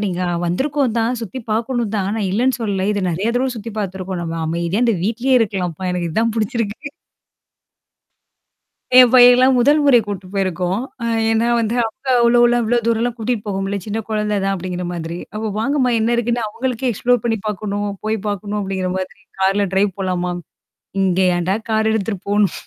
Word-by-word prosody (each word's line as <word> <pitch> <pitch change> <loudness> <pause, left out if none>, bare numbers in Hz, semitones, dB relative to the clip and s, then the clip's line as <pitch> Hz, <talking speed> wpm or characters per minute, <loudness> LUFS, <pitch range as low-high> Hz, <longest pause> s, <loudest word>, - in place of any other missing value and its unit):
நீங்க 185 -2 -2 0.2
வந்திருக்கோந்தான் 245 +2 0
சுத்தி 230 +4 -6
பார்க்கணும் 230 0 -1
தான். 195 -2 -1
நான் 205 -4 -1
இல்லன்னு 250 +5 +1
சொல்லல. 200 -4 -1
இத 205 - -1
நெறைய 185 +6 -1
தடவ 260 +2 +1
சுத்தி 225 +1 -6
பார்த்துருக்கோம். 190 -2 -4
நம்ம 165 -1 -4
அமைதியா 170 +7 -1
இந்த 230 - +2
வீட்லயே 235 +6 +1
இருக்கலாம்ப்பா, 185 -5 -2
எனக்கு 175 -2 -2
இதான் 225 +3 +1
புடிச்சிருக்கு. 230 +4 -2 2.1
என் 250 -2 +9
பையன்லாம் 250 +1 +7
முதல் 290 +5 +4
முறை 275 -4 +7
கூட்டிட்டு 195 -3 -6
போயிருக்கோம். 185 0 -1 0.2
அ - - -1 0.3
ஏன்னா 225 +1 +2
வந்து 230 0 0
அங்க 265 +4 -13
அவ்ளோலாம் 240 0 +4
இவ்ளோ 235 +2 +1
தூரம்லாம் 230 +1 0
கூட்டிட்டு 225 -1 -2
போக 195 -2 -2
முடியல. 195 0 -3
சின்ன 215 +1 -3
குழந்தை 210 -1 -1
தான் 195 - +1
அப்பிடிங்கிற 180 -1 -4
மாதிரி. 170 0 -5 0.2
அப்ப 215 0 -2
வாங்கம்மா 260 +2 +1
என்ன 220 +1 +1
இருக்குன்னு 240 0 0
அவுங்களுக்கே 250 +3 -2
எக்ஸ்ப்ளோர் 240 +2 +1
பண்ணி 225 -2 0
பார்க்கணும், 205 0 -2
போய் 215 +1 0
பார்க்கணும் 205 +1 -3
அப்பிடிங்கிற 190 -2 -2
மாதிரி 185 0 -6 0.2
கார்ல 195 +1 +2
டிரைவ் 195 +1 +2
போலாம்மா! 180 -2 -1 0.7
இங்க 185 -1 +1 0.2
ஏன்டா 180 +3 0
கார் 220 0 +2
எடுத்துட்டு 205 -3 -2
போணும்? 205 -3 +2
215 Hz, 165 wpm, -19 LUFS, 190-235 Hz, 2.1 s, என்